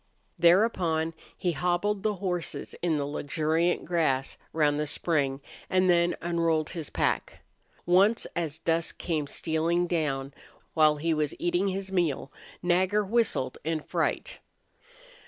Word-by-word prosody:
Thereupon 170 -3 +3 0.2
he 180 - 0
hobbled 180 +6 0
the 210 0 0
horses 180 -3 -3
in 165 -3 +1
the 145 - -1
luxuriant 155 +4 0
grass 150 -6 0 0.2
round 150 -2 +2
the 150 - -1
spring, 140 -4 0 0.3
and 185 -1 +3
then 170 0 +3
unrolled 165 -2 0
his 165 -5 -5
pack. - - -1 0.4
Once 195 +6 +4
as 160 -3 -2
dusk 165 0 -1
came 155 -4 -2
stealing 165 +3 0
down, 140 -6 -1 0.4
while 155 -1 +5
he 160 +2 0
was 150 -2 -1
eating 175 +3 0
his 195 0 -3
meal, 165 -7 0 0.3
Nagger 185 +4 +2
whistled 205 - 0
in 160 +1 -1
fright. - - -2
170 Hz, 130 wpm, -28 LUFS, 155-180 Hz, 0.4 s, while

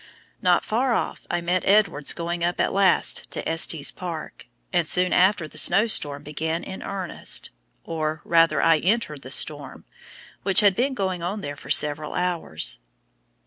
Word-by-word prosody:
Not - - +2
far 240 +2 0
off - - -4
I 175 - -1
met 175 +1 -1
Edwards 200 -8 +2
going 170 0 -4
up 175 +1 -1
at - - 0
last 195 -1 +2
to - - -4
Estes 160 -2 0
Park, 165 -8 -8 0.3
and 175 -1 +2
soon 180 +3 +2
after 180 -2 +2
the - - -1
snow 200 +5 +5
storm 145 -10 0
began 160 +3 -4
in 190 - -8
earnest 190 -3 -2 0.3
or 155 -1 -3
rather 165 -1 +3
I 165 -1 +4
entered 180 - -1
the 130 - -10
storm, 145 0 -2 0.6
which 195 +2 +5
had 200 -2 +4
been 265 +4 -1
going 190 -5 -3
on 195 +5 -4
there 145 -5 -6
for - - -14
several 150 +1 +2
hours. 80 - -2
170 Hz, 165 wpm, -23 LUFS, 155-190 Hz, 0.6 s, snow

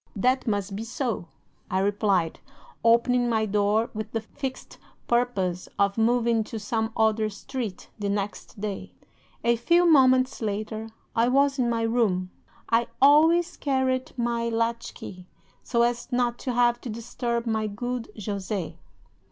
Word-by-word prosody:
"'"That 255 +6 +1
must 200 -2 -1
be 215 - -4
so," 230 -5 -3 0.4
I 185 - 0
replied, 195 -3 +1 0.4
opening 240 +1 +4
my 220 -2 +1
door 210 +2 +1
with 215 -1 -6
the 225 - +1
fixed 265 +4 -7 0.3
purpose 200 -7 0
of 200 0 +2
moving 230 0 +2
to 225 - -6
some 220 +1 -2
other 220 -1 +2
street 215 -1 -6
the 205 -1 -1
next 200 +1 -4
day. 195 - -5 0.5
"'A 235 0 +3
few 340 +9 +3
moments 260 -5 +4
later 215 +1 -3 0.3
I 230 +1 +3
was 275 +2 +3
in 240 -2 +2
my 230 -1 0
room; 210 -6 +1 0.4
I 230 +1 +2
always 325 +5 +5
carried 260 -2 -1
my 235 -1 0
latchkey, 230 -5 -3 0.3
so 235 -1 +1
as 240 +2 -1
not 245 -1 0
to 255 - -3
have 240 0 +3
to 250 - -6
disturb 235 +1 -3
my 220 -2 0
good 245 +3 -4 0.2
Jose. 200 -3 -3
230 Hz, 145 wpm, -26 LUFS, 210-245 Hz, 0.5 s, always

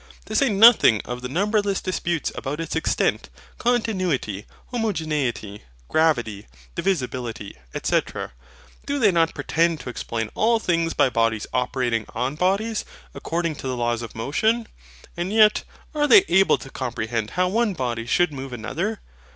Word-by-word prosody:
To - - -6
say 275 - +4
nothing 205 - +7
of 125 0 -5
the 125 - -5
numberless 205 - +1
disputes 175 -3 -2
about 145 +3 -4
its 165 - -4
extent, 160 - 0 0.3
continuity, 185 - -1 0.2
homogeneity, 155 - -2 0.3
gravity, 120 -11 +1 0.3
divisibility, 125 - -3 0.3
&c. - - +3 0.9
do 285 0 -1
they 220 -7 +4
not 165 -2 +2
pretend 165 0 +1
to 125 - -6
explain 115 -2 -4
all 230 +1 +3
things 170 -6 0
by 130 - +3
bodies 115 -2 +1
operating 125 -3 0
on 125 +4 -1
bodies, 200 +7 0 0.3
according 170 -1 -2
to - - -6
the 130 -1 -2
laws 120 -1 0
of 115 - -8
motion? 220 - 0 0.5
and 175 +2 -3
yet, 215 -1 +5 0.3
are 295 -1 +1
they 400 +4 +8
able 195 0 +4
to 135 - -11
comprehend 115 -3 -3
how 180 0 +3
one 210 +1 +1
body 120 -4 -3
should 175 +5 +2
move 135 -1 -7
another? 170 - -3
160 Hz, 145 wpm, -23 LUFS, 120-200 Hz, 0.9 s, they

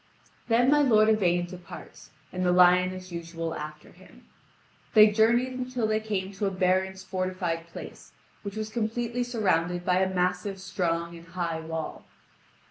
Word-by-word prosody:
Then 245 +3 +4
my 295 0 +5
lord 220 -6 +5
Yvain 175 -5 +2
departs, 180 0 -11 0.2
and 185 0 -2
the 180 - +3
lion 180 +1 +5
as 185 0 -9
usual 165 -1 -5
after 155 0 -8
him. - - -18 0.7
They 215 0 +8
journeyed 235 +4 +3
until 255 -2 -3
they 215 0 +1
came 200 -3 -3
to 200 +1 -2
a - - +2
baron's 190 0 0
fortified 185 -3 -3
place, 170 - -10 0.3
which 200 -1 -7
was 215 0 -4
completely 235 +2 -2
surrounded 180 -7 0
by 180 0 +3
a 190 0 +1
massive, 180 +2 -1
strong, 170 -3 -2
and 170 0 -13
high 170 -1 -3
wall. 160 0 -5
185 Hz, 155 wpm, -27 LUFS, 175-215 Hz, 0.7 s, They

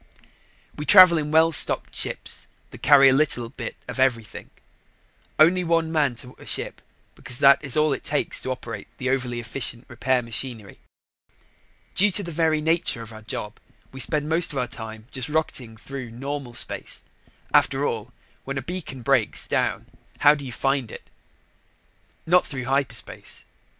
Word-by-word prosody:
We 150 - -5
travel 185 -4 +8
in 150 -1 -3
well 160 +1 +4
stocked - - +4
ships - - -1 0.2
that - - -12
carry 140 -1 +7
a 130 - +6
little 130 -5 +1
bit 130 - -7
of - - -6
everything; 120 -4 -1 0.9
only 175 +4 +5
one 165 -1 +1
man 145 -6 +1
to 125 +2 -11
a - - -13
ship - - -2 0.3
because 125 0 -2
that 140 +2 +5
is 140 0 0
all 150 -1 +3
it - - -5
takes 145 0 -1
to - - -5
operate 115 -5 -6
the 130 0 -1
overly 125 -3 -2
efficient 120 0 -3
repair 125 +1 0
machinery. 115 -2 -4 1.1
Due 205 +2 +5
to 205 - 0
the 170 - -6
very 160 -1 +1
nature 160 -7 0
of 115 0 -12
our 110 - -11
job, 105 0 -6 0.3
we 135 - -10
spend 150 +2 +2
most 165 +2 +1
of 140 - -6
our 125 - 0
time 110 -2 -9
just 130 0 -4
rocketing 130 -7 -2
through 130 +1 -8
normal 135 +1 -6
space. 115 - -4 0.5
After 140 +1 +3
all, 115 -1 -3 0.3
when 135 0 -5
a 135 - -3
beacon 165 -8 -6
breaks 110 - +1
down, - - -1 0.4
how 145 0 +7
do 145 -2 -6
you 130 - -7
find 135 0 -1
it? - - -12 1.1
Not 180 +2 +4
through 130 -4 -5
hyperspace. 135 0 -3
135 Hz, 165 wpm, -24 LUFS, 120-155 Hz, 1.1 s, travel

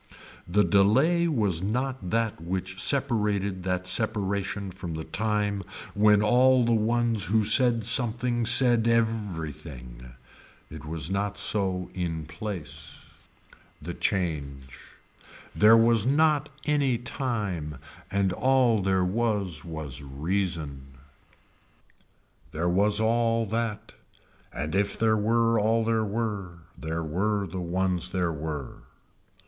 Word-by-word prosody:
The 100 +4 +3
delay 135 - +3
was 105 - 0
not 125 0 -2
that 115 -5 -1
which 95 +2 -4
separated 105 -8 0
that 90 -1 -1
separation 100 0 -2
from 90 -3 -7
the 80 - -5
time 105 +3 -1 0.3
when 105 0 +4
all 125 +3 +4
the 120 - +1
ones 115 -1 +1
who 110 +4 +2
said 115 0 +2
something 120 0 +1
said 120 -2 +6
every 110 -9 0
thing. 60 -2 -11 0.6
It 80 0 -9
was 80 +1 -3
not 100 +1 -2
so 95 -3 -1
in 80 -4 -3
place. 85 +2 -7 0.7
The 85 +3 -6
change. 70 -9 -3 0.8
There 110 +2 +7
was 115 -1 +3
not 150 +1 +2 0.2
any 140 -5 +1
time 105 - -4 0.3
and 100 -2 0
all 125 -2 +2
there 95 -1 +1
was 100 -6 -1
was 80 -5 -6
reason. 70 -2 -3 1.5
There 85 +3 -1
was 100 +4 +2
all 115 0 +1
that 110 0 -3 0.6
and 75 +1 -4
if 100 +1 0
there 110 -1 +2
were 115 +2 +2
all 110 +2 +2
there 110 -1 +1
were 100 -5 -4 0.2
there 80 +1 -4
were 100 +6 -1
the 90 +1 -6
ones 90 +1 -1
there 90 -2 -1
were. 75 -3 -6
100 Hz, 120 wpm, -26 LUFS, 85-115 Hz, 1.5 s, There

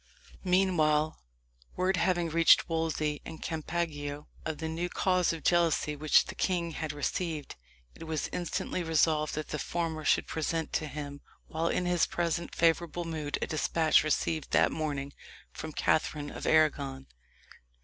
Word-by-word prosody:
Meanwhile, 160 -5 +2 0.6
word 185 +1 +1
having 175 -1 +1
reached 165 +1 +5
Wolsey 160 -2 -1
and 160 - -8
Campeggio 155 -3 -3 0.2
of 160 -1 -3
the 160 +2 -4
new 165 +2 -2
cause 185 -2 +2
of 165 -1 -6
jealousy 165 -3 +2
which 150 +1 +4
the - - -7
king 175 -3 -1
had 155 0 -4
received, 150 +1 -3 0.4
it - - -10
was 160 -2 -2
instantly 180 +1 -3
resolved 155 -2 +2
that 155 0 -4
the 150 - -3
former 165 -1 -2
should - - +3
present 160 0 -2
to 155 - 0
him, 145 0 -7 0.2
while 165 +1 -2
in 180 - 0
his 175 -1 +2
present 170 0 -2
favourable 170 +1 +1
mood, 155 -3 -3
a - - +1
despatch 155 +1 +2
received 155 0 -1
that - - +4
morning 145 -3 -3 0.4
from 160 - -7
Catherine 150 -1 0
of - - -6
Arragon. 140 -4 +2
160 Hz, 150 wpm, -30 LUFS, 150-170 Hz, 0.6 s, reached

